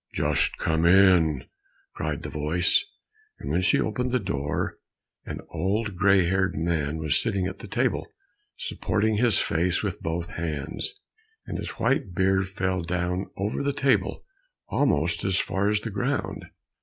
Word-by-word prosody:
"Just - - +1
come 80 0 0
in," 90 -6 +5 0.5
cried - - -3
the - - -4
voice, 80 - +2 0.5
and - - -5
when 90 - +2
she 90 - +3
opened 125 +4 -1
the 125 0 +1
door, 75 - -2 0.5
an - - -5
old 100 +5 -1
gray 95 0 +4
haired 95 +1 +1
man 80 -2 -1
was 80 -2 +1
sitting 100 -5 0
at 95 - -5
the - - -8
table, - - 0 0.5
supporting 110 0 0
his 115 -2 +3
face 85 +4 +1
with 100 -4 -3
both 85 +1 -3
hands, 80 - -3 0.5
and - - -4
his - - -4
white 90 -3 +1
beard 95 +1 +2
fell 95 -1 -1
down 90 +2 -2
over 100 +6 -1
the 140 0 0
table 135 -1 +1 0.4
almost 85 - +1
as 95 -1 +2
far 100 +2 +1
as 105 0 +1
the 115 - -5
ground. 125 +8 -2
95 Hz, 155 wpm, -26 LUFS, 85-105 Hz, 0.5 s, in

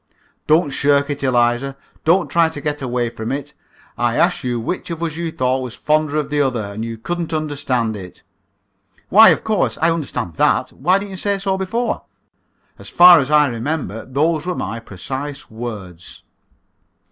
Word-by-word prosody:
"Don't 155 -1 +3
shirk 140 +1 +2
it, 145 - -4
Eliza. 125 +1 +1 0.3
Don't 175 +3 +3
try 170 -1 +3
to 160 - -7
get 145 0 -3
away 120 -2 -1
from 110 -1 -5
it. 145 +2 -4 0.5
I 120 -1 +1
asked 175 +3 +2
you 120 -2 -1
which 145 +12 -4
of 170 0 -4
us 160 -2 -2
you 170 -1 -3
thought 130 -2 0
was 125 -3 -6
the - - -23
fonder 155 0 +1
of 150 -1 -2
the 145 0 +2
other, 115 -7 -1
and 110 +2 -5
you 115 0 -5
couldn't 170 +8 -4
understand 135 -7 -1
it." 90 -3 -10 0.9
"Why, 220 +3 +8
of - - +2
course, 215 -4 0
I 165 +2 +3
understand 140 - -3
that. - - +2
Why 180 +8 +2
didn't 200 0 -6
you 190 - -6
say 200 +2 0
so 195 -1 -1
before?" 220 +6 -2 0.8
"As - - -9
far 175 -1 +8
as 140 0 -2
I 150 -1 +5
remember, 120 - -3
those 150 +4 0
were 180 - -1
my 115 - -4
precise 135 +8 -7
words." 105 -7 -8
145 Hz, 180 wpm, -19 LUFS, 120-165 Hz, 0.9 s, Why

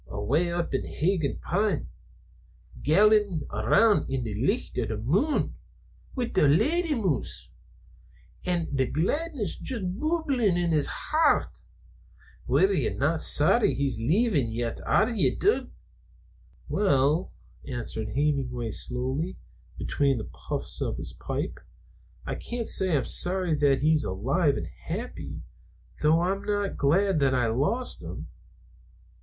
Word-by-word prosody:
Awa' 140 +13 0
up 170 -2 -2
on 135 - +1
Higan' 165 -3 -1
Pond, 200 -2 0 1.0
gallantin' 205 +1 +3
around 125 - +3
i' 135 - 0
the 115 -4 -4
licht 135 - -1
o' 120 - 0
the 110 0 -3
mune 185 - +1 0.6
wi' 245 -3 -2
a 150 - +5
lady 305 - +2
moose, 185 - -2 0.9
an' 175 -2 -1
the 130 -1 +1
gladness 230 - -1
juist 235 -6 -3 0.2
bubblin' 285 - +1
in 175 -1 0
his 150 -3 +2 0.2
hairt. 310 -1 +2 0.9
Ye're 390 +1 +2
no - - +1
sorry 220 - +3
that - - -7
he's 135 -4 0
leevin' 155 - +1
yet, 115 0 -3
are 215 - +4
ye, 215 - +2
Dud?" 415 +3 +1 1.0
"Well," 155 -3 +2 0.4
answered 115 -3 -4
Hemenway 125 -3 -1
slowly, 130 - -3 0.4
between 140 -2 +1
the 110 - -4 0.2
puffs - - -3
of - - -2
his - - -5
pipe, - - -4 0.7
"I - - -3
can't 235 -1 -4
say 185 -5 +2
I'm 130 - -1
sorry 180 -2 0
that 145 -3 +2
he's 155 0 +3
alive 135 - +1
and 85 - -4
happy, 80 - -7 0.6
though 155 +2 +4
I'm 190 +3 -1
not 205 -1 -1
glad 175 +5 +2
that 135 -2 +2
I 125 -1 +2
lost 150 - 0
him. - - -8
160 Hz, 130 wpm, -27 LUFS, 135-205 Hz, 1.0 s, a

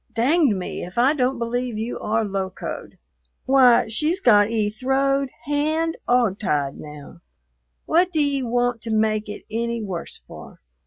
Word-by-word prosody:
"Dang 265 - +2
me 180 - -5
if 180 +4 -10
I 255 +5 +4
don't 260 -2 0
believe 240 0 -2
you 225 +3 -4
are 220 +1 0
locoed. 190 -2 -5 0.5
Why, 255 -3 +5
she's 305 - -1
got 210 - +5
'e 215 -2 0
throwed 270 +4 0 0.2
hand 310 +3 0
'og 235 -5 +2
tied 145 -8 -1
now. 150 - -11 0.7
What 355 +3 +2
d'e 285 -4 +1
want 245 -1 0
to 230 - -7
make 215 -1 0
it 210 - -8
any 235 0 -2
worse 185 -4 -5
for?" - - -13
235 Hz, 150 wpm, -22 LUFS, 210-275 Hz, 0.7 s, Why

